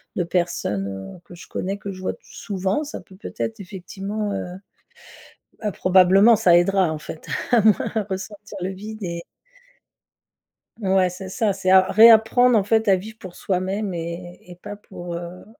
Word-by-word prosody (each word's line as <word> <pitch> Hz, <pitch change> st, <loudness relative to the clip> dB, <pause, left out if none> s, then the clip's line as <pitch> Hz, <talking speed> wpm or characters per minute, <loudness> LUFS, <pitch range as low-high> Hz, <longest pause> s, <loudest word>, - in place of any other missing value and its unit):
de 180 Hz, -, 0 dB
personnes, 170 Hz, -, -1 dB, 0.3 s
heu, -, -, -14 dB
que 175 Hz, -, -13 dB
je 175 Hz, -, -13 dB
connais, 195 Hz, +2 st, -4 dB
que 200 Hz, -1 st, -7 dB
je 185 Hz, -1 st, -10 dB
vois 185 Hz, -, -2 dB
t -, -, -18 dB
souvent, 195 Hz, +5 st, -3 dB
ça 300 Hz, -, -7 dB
peut 190 Hz, -, -17 dB
peut-être 225 Hz, +2 st, -5 dB
effectivement, 200 Hz, +2 st, -5 dB
heu 180 Hz, -2 st, -5 dB, 1.1 s
bah, 215 Hz, -, -1 dB
probablement 190 Hz, +5 st, +5 dB
ça 185 Hz, -5 st, +5 dB
aidera 185 Hz, -1 st, +2 dB
en 155 Hz, -, -4 dB
fait 155 Hz, +1 st, -10 dB, 0.3 s
à 240 Hz, -, +6 dB
moins 215 Hz, 0 st, +2 dB
ressentir 200 Hz, +2 st, -7 dB
le 185 Hz, -, -2 dB
vide 215 Hz, +3 st, -8 dB
et 170 Hz, -2 st, -4 dB, 1.6 s
Ouais, 190 Hz, -2 st, +2 dB
c'est 185 Hz, +1 st, -8 dB
ça, 205 Hz, +1 st, 0 dB
c'est 185 Hz, -, -2 dB
à 190 Hz, 0 st, +7 dB
réapprendre 225 Hz, +2 st, +6 dB
en 205 Hz, -, +2 dB
fait 220 Hz, 0 st, +2 dB
à 190 Hz, -, +5 dB
vivre 215 Hz, +4 st, -10 dB
pour 185 Hz, -5 st, -11 dB
soi-même 190 Hz, +2 st, -2 dB
et 170 Hz, +1 st, -6 dB
et 175 Hz, -, -12 dB
pas 205 Hz, +3 st, -8 dB
pour, 175 Hz, -4 st, -9 dB
heu, 175 Hz, +1 st, -8 dB
190 Hz, 175 wpm, -22 LUFS, 180-210 Hz, 1.6 s, à